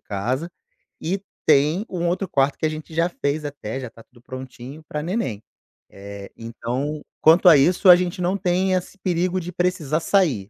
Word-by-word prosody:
casa 125 +11 -3 0.5
e 190 +4 -2 0.2
tem 155 +7 +3
um 175 -2 -2
outro 185 +3 -1
quarto 140 -4 +1
que - - -2
a - - +2
gente 155 +1 -8
já 170 +1 +2
fez 150 -2 -2
até, 135 -4 -5
já 130 -3 -6
tá 115 - -16
tudo 125 -1 -23
prontinho, 130 +3 -9
pra 150 - -4
neném. 170 - -2 0.5
Eh, 100 0 -10
então, 125 +6 -4 0.2
quanto 165 +4 +6
a 160 - +9
isso, 175 +7 +4
a 180 - +12
gente 180 0 -2
não 180 +2 +1
tem 185 0 +1
esse 185 +2 -3
perigo 180 0 0
de 180 0 -6
precisar 175 -4 0
sair. 150 - +1
155 Hz, 185 wpm, -22 LUFS, 130-180 Hz, 0.5 s, a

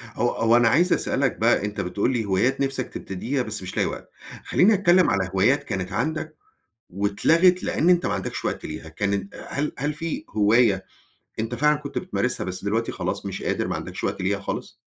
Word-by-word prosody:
هو 120 +1 +1
هو 115 +1 +2
أنا 120 -1 +4
عايز 175 +8 +4
أسألك 135 -1 0
بقى، 115 -2 +3
أنت 105 0 -3
بتقول 100 +7 -1
لي 115 -3 -1
هوايات 110 +8 +1
نفسك 135 -2 -2
تبتديها 120 +9 -3
بس 110 -3 -5
مش 90 - -7
لاقي - - +3
وقت. - - -7 0.3
خلّيني 205 +5 +4
اتكلّم 185 -2 +4
على 95 -2 0
هوايات 120 +10 +3
كانت 95 -1 -4
عندك 155 +6 -2 0.5
واتلغت، 165 - +3
لإن 170 - +1
أنت 180 -1 +4
ما - - 0
عندكش - - -4
وقت - - -3
ليها. 80 +1 -7
كانت 100 +3 -2
هل 145 +2 -2
هل 145 +3 -1
في 160 0 -4
هواية 105 -2 +3 0.5
أنت 115 +2 -2
فعلًا 150 +4 +3
كنت 140 -1 -7
بتمارسها، 180 -8 -1
بس 95 0 -5
دلوقتي 110 +3 -1
خلاص 95 +2 -4
مش 95 -1 -5
قادر، - - -1
ما - - -2
عندكش - - -6
وقت - - -2
ليها 100 +2 0
خالص؟ 100 - -5
115 Hz, 195 wpm, -24 LUFS, 100-145 Hz, 0.5 s, أنا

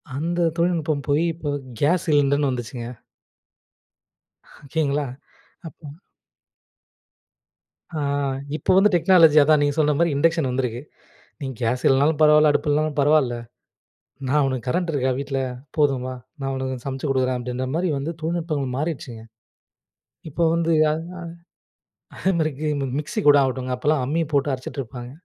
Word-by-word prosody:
அந்த 170 +3 0
தொழில்நுட்பம் 165 -4 0
போயி, 145 +3 +2
இப்ப 155 -3 -4 0.3
கேஸ் 170 +5 +2
சிலிண்டர்ன்னு 145 -1 +3
வந்துச்சுங்க. 120 -1 -5 1.8
ஓகேங்களா. 145 -1 -1 0.6
அப்போ 160 0 -13 2.1
ஆ. 155 - -4 0.6
இப்ப 170 - +1
வந்து 205 +2 +6
டெக்னாலஜி 165 -3 +5
அதான். 155 0 +4
நீங்க 145 0 +1
சொன்ன 150 -1 +3
மாரி 170 0 +3
இண்டக்ஷன் 160 -3 +2
வந்திருக்கு. 125 -2 -2 0.6
"நீங்க 135 -2 -5
கேஸ் 120 +2 0
இல்லன்னாலும் 145 +3 +3
பரவால்ல, 150 0 +6
அடுப்பு 150 - -1
இல்லன்னாலும் 150 0 0
பரவால்ல, 140 -4 +3 0.9
நா 140 - 0
உனக்கு 130 -3 -3
கரண்ட் 175 +5 0
இருக்கா 130 -3 0
வீட்டுல? 135 -1 -3 0.4
போதும் 140 -4 +2
வா, 130 - -4 0.3
நா 135 - -2
உனக்கு 130 -2 -4
சமச்சு 135 +1 -3
குடுக்கறேன்." 130 -1 +1
அப்படீன்ற 125 +1 -4
மாரி 175 +1 0
வந்து 145 +5 -3
தொழில்நுட்பங்கள் 155 -6 -2
மாறிடுச்சுங்க. 130 -7 -4 1.1
இப்ப 165 +3 +1
வந்து, 165 0 +1 0.2
அ - - +2
அ 165 +3 -5 1.0
அதே 190 - 0
மாரி 155 -1 +1
கி 155 - -1 0.3
மிக்ஸி 150 - -3
கூட 145 - +8
ஆகட்டுங்க 130 -1 -2
அப்போல்லாம் 145 +1 +1
அம்மி 160 +5 0
போட்டு 140 0 +2
அரைச்சுட்டுருப்பாங்க. 125 -2 -6
145 Hz, 135 wpm, -23 LUFS, 130-160 Hz, 2.1 s, கூட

